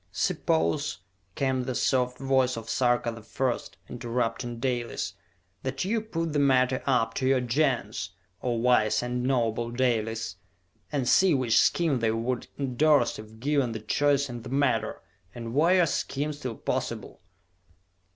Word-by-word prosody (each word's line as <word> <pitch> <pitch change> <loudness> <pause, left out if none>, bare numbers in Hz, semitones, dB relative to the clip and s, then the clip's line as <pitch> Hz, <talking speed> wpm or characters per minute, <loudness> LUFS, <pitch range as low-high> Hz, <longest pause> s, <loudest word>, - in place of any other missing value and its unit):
"Suppose," 80 +1 0 0.4
came 130 -2 0
the 130 -1 -3
soft 125 0 +1
voice 130 -2 +1
of 115 0 -5
Sarka 120 -1 +2
the 115 0 -9
First, 125 +3 -3
interrupting 120 -1 -3
Dalis, 120 -6 -2 0.5
"that 130 +4 -3
you 220 +3 0
put 165 -7 -3
the 145 - +2
matter 130 -2 +3
up 115 -4 +2
to 130 - -1
your 135 -1 +4
Gens, 120 - 0 0.3
O 125 - 0
wise 115 -2 +3
and 125 0 -2
noble 120 -3 0
Dalis, 115 -5 -1 0.5
and 140 -4 -1
see 185 +3 +5
which 125 -4 +3
scheme 160 -7 +2
they 115 -1 +1
would 115 +3 -2
endorse 140 -2 +2
if 110 +1 -12
given 140 -2 +1
the 110 - -4
choice 140 +5 +1
in 120 -2 -7
the 120 - -9
matter 130 -5 0 0.3
and 115 -1 -6
were 165 +7 +4
your 180 -2 +5
scheme 150 -1 -2
still 130 -5 -5
possible!" - - -4
125 Hz, 150 wpm, -27 LUFS, 115-135 Hz, 0.5 s, see